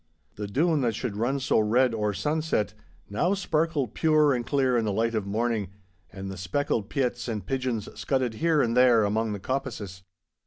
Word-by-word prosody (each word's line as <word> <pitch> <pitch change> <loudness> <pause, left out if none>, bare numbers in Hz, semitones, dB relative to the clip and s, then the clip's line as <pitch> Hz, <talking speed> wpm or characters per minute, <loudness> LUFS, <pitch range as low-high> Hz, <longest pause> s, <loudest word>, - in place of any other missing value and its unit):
The 105 0 -5
Doon, 150 - +1
that 115 -4 0
should 115 -4 -3
run 125 +6 0
so 130 - +2
red 120 +3 +3
or 105 -2 0
sunset, 150 - -1 0.3
now 175 - +1
sparkled 160 - 0
pure 155 -3 +3
and 120 -2 -1
clear 130 -1 +1
in 115 - +2
the 105 - 0
light 115 +3 0
of 105 -3 -2
morning, 110 -1 -1 0.4
and 95 +1 -6
the 95 - -7
speckled 100 +3 -1
piets 125 -3 -1
and 105 -5 -3
pigeons 125 -4 -2
scudded 130 -4 -1
here 160 +5 +2
and 115 -1 0
there 125 -3 +5
among 110 +1 0
the 100 - -5
coppices. 110 -6 -4
120 Hz, 185 wpm, -27 LUFS, 105-135 Hz, 0.4 s, there